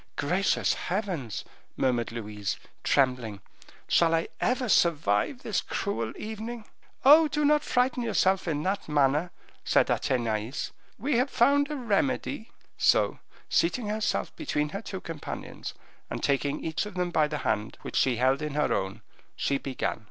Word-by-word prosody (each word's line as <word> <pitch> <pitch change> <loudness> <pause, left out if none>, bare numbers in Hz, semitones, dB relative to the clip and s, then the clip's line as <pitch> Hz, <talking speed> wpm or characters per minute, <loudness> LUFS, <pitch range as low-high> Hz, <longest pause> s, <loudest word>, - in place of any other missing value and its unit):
"Gracious 180 +5 +1
heavens!" 175 - -3 0.3
murmured 120 -3 +1
Louise, 105 -3 -4 0.3
trembling, 125 -7 +1 0.5
"shall 165 -1 +4
I 165 - -1
ever 250 0 +1
survive 165 - +2
this 210 - 0
cruel 115 - -2
evening?" 220 +1 -6 0.4
"Oh! 310 +3 +9
do 300 0 0
not 300 0 +4
frighten 250 0 +1
yourself 190 -5 +2
in 150 -2 -1
that 190 -3 -2
manner," 150 +3 +2 0.3
said - - +3
Athenais; 115 -1 -1 0.3
"we 260 +3 0
have 255 +3 +2
found 285 +4 +3
a 300 - -3
remedy." 205 - -1 0.3
So, - - +3 0.3
seating 210 +6 +1
herself 215 0 -1
between 150 0 -1
her 195 +7 -5
two 190 -4 -6
companions, 165 -3 -6 0.3
and - - -5
taking 140 +1 0
each 160 +5 -1
of 210 - -10
them 180 -1 -1
by 155 -3 +3
the 150 0 -3
hand, 105 +1 -1
which - - -6
she 130 -2 +3
held 130 +4 +2
in 150 -1 -3
her 150 - +2
own, 95 0 -3 0.3
she 140 -1 0
began. 130 -3 -3
165 Hz, 150 wpm, -28 LUFS, 130-220 Hz, 0.5 s, Oh